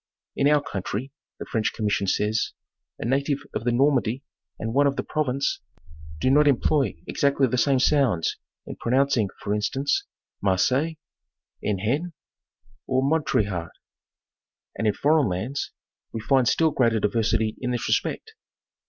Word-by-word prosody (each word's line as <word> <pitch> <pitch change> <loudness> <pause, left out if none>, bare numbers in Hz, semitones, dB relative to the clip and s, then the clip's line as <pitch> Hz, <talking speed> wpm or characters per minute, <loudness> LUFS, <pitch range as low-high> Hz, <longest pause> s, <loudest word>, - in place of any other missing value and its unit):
'In 140 - +2
our 150 -1 +4
coun 100 -9 -4
try," 125 +9 -4 0.3
the - - -7
French 110 -3 -1
commission 105 -2 -1
says, 105 +3 0 0.4
"a - - -5
native 140 +3 0
of - - -3
the 120 - +2
Normandy 130 -1 +2 0.3
and 115 +1 -4
one 140 +2 +4
of 140 - 0
the - - -2
Provence 140 -3 -1 0.6
do 130 - +2
not 150 +2 +5
employ 140 +1 +2
exactly 140 -1 +2
the 125 0 0
same 140 0 +3
sounds 130 - +2 0.3
in - - -8
pronouncing, 130 -3 +2
for 100 - -1
instance, 135 +7 0 0.3
Marseille, 130 - +1 0.7
Enghien, 120 - -1 0.7
or 130 0 +1
Montrichard, 105 - 0 1.1
and, 110 - -1
in 105 - +3
foreign 150 -4 +3
lands, 110 +11 -3 0.4
we 115 - -4
find 130 +2 +2
still 160 +5 +3
greater 115 -5 +2
diversity 110 +1 +1
in 125 - -2
this 120 -2 -2
respect." - - -1
130 Hz, 145 wpm, -25 LUFS, 110-140 Hz, 1.1 s, not